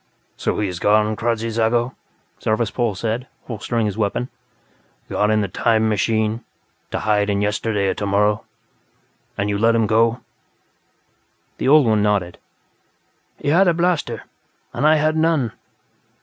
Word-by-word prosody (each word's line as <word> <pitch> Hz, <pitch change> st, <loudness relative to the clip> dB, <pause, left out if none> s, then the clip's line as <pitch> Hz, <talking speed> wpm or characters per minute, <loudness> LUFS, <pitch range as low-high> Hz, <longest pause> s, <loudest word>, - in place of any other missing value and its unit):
"So -, -, -2 dB
he 105 Hz, -, 0 dB
is 90 Hz, -2 st, -5 dB
gone, 105 Hz, +2 st, +3 dB
Kradzy 115 Hz, 0 st, -1 dB
Zago?" 115 Hz, +2 st, +1 dB, 0.5 s
Zarvas 110 Hz, 0 st, 0 dB
Pol 120 Hz, -5 st, 0 dB
said, 115 Hz, +5 st, -3 dB, 0.2 s
holstering 115 Hz, 0 st, -2 dB
his 105 Hz, +1 st, -3 dB
weapon. 110 Hz, +4 st, -1 dB, 0.8 s
"Gone 105 Hz, -, +1 dB
in 110 Hz, 0 st, +2 dB
the 100 Hz, -, -1 dB
'time 110 Hz, +3 st, +1 dB
machine', 110 Hz, +2 st, 0 dB, 0.5 s
to -, -, -3 dB
hide 105 Hz, -1 st, +1 dB
in 100 Hz, 0 st, +1 dB
yesterday 105 Hz, 0 st, 0 dB
or -, -, +1 dB
tomorrow. 105 Hz, +1 st, +1 dB, 0.9 s
And 100 Hz, -, -1 dB
you 100 Hz, -1 st, -1 dB
let 115 Hz, +1 st, +3 dB
him 115 Hz, -1 st, +2 dB
go?" 115 Hz, +3 st, +2 dB, 1.4 s
The -, -, -1 dB
old 145 Hz, 0 st, +6 dB
one 110 Hz, -2 st, +2 dB
nodded. 100 Hz, -4 st, 0 dB, 1.0 s
"He 145 Hz, -, -3 dB
had 180 Hz, +6 st, +4 dB
a 170 Hz, -, +3 dB
blaster, 170 Hz, -, 0 dB, 0.5 s
and 150 Hz, -, +1 dB
I 155 Hz, -, +6 dB
had 155 Hz, +1 st, +1 dB
none." 160 Hz, -7 st, +1 dB
110 Hz, 150 wpm, -20 LUFS, 105-120 Hz, 1.4 s, old